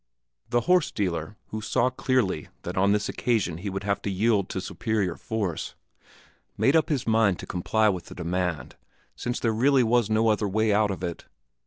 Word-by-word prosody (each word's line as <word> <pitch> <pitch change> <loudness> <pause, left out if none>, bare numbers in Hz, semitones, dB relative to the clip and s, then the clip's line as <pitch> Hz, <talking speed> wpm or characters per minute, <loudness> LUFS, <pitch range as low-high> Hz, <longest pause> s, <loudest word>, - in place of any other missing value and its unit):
The 120 - +2
horse 180 +1 +3
dealer, 90 0 -3
who 110 - -4
saw 125 +3 +1
clearly 125 - 0 0.2
that - - -5
on 100 +2 +3
this 105 0 +1
occasion 100 -9 -1
he 100 +3 -4
would 95 +1 -4
have 100 0 -1
to - - -3
yield 100 0 +1
to - - -3
superior 95 -1 -2
force, 100 -7 -3 0.8
made 135 - +3
up 160 - +3
his 145 -6 0
mind 110 -5 +3
to - - -8
comply 110 +5 +1
with 95 -4 -1
the - - -11
demand, 90 -1 -3 0.4
since 120 0 -3
there 115 -2 +1
really 130 +3 +4
was 120 -1 +2
no 110 +1 +3
other 105 -1 +1
way 110 +2 +1
out 105 0 +3
of 95 -2 -4
it. 85 -2 -4
105 Hz, 190 wpm, -26 LUFS, 95-115 Hz, 0.8 s, really